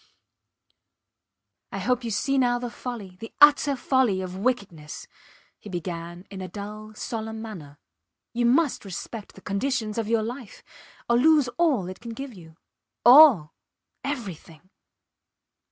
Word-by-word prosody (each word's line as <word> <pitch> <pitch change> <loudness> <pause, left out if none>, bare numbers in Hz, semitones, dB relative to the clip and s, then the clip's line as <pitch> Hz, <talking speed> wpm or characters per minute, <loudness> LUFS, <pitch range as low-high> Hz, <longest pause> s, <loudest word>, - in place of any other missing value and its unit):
I - - -4
hope 250 -1 0
you 235 - -3
see 275 +6 +1
now 245 -1 +3
the 245 -1 -5
folly 220 -8 -7
the 225 - -8
utter 290 -1 +6
folly 255 -6 +2
of 185 -1 -6
wickedness, 195 -9 -3 0.5
he 210 - -11
began 175 0 -6
in 190 -1 -7
a 185 - -5
dull, 210 +2 -8
solemn 220 -1 -5
manner. 175 -11 -9 0.6
You 240 0 +1
must 280 +3 +2
respect 205 +2 -7
the 195 - -13
conditions 220 +1 -1
of 220 - -2
your 225 -1 +1
life 240 0 -7 0.4
or 235 - +3
lose 300 -2 +5
all 270 - +1
it 185 0 -8
can 230 -1 -8
give 270 -1 -7
you. 165 -4 -15 0.5
All! 245 - +8 0.5
Everything! 185 - -6
220 Hz, 135 wpm, -25 LUFS, 185-250 Hz, 0.6 s, All